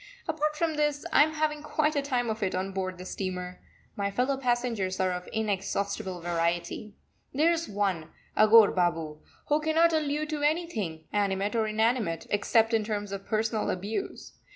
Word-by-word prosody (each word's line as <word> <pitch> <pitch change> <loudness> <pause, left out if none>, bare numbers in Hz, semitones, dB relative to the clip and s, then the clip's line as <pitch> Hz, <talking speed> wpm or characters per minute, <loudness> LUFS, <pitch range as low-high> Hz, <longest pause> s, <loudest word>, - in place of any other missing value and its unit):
Apart 305 -1 0
from 320 -1 -1
this, 295 -1 0
I - - +7
am 310 +1 +3
having 300 -1 0
quite 305 0 0
a 285 - +2
time 250 -4 0
of 220 - -5
it 190 -3 0
on 190 +1 -2
board 185 -1 -3
the 180 - -9
steamer. 180 -1 -5 0.3
My 200 -1 -1
fellow 250 +7 0
passengers 240 -7 -1
are 185 -1 +2
of 180 0 -5
inexhaustible 200 -2 -2
variety. 170 +4 -2 0.4
There 315 +4 +4
is 335 0 -1
one, 195 -6 -1 0.3
Aghore 215 0 +7
Babu, 165 -4 0 0.3
who 295 +1 +3
cannot 325 +2 +3
allude 305 0 0
to 300 -1 -2
anything, 290 - -1
animate 200 +1 0
or 220 -1 +2
inanimate, 215 -5 0
except 225 +2 +3
in 220 -1 +3
terms 205 -2 -3
of 195 0 -6
personal 220 0 0
abuse. 205 - -4
215 Hz, 170 wpm, -28 LUFS, 190-290 Hz, 0.4 s, I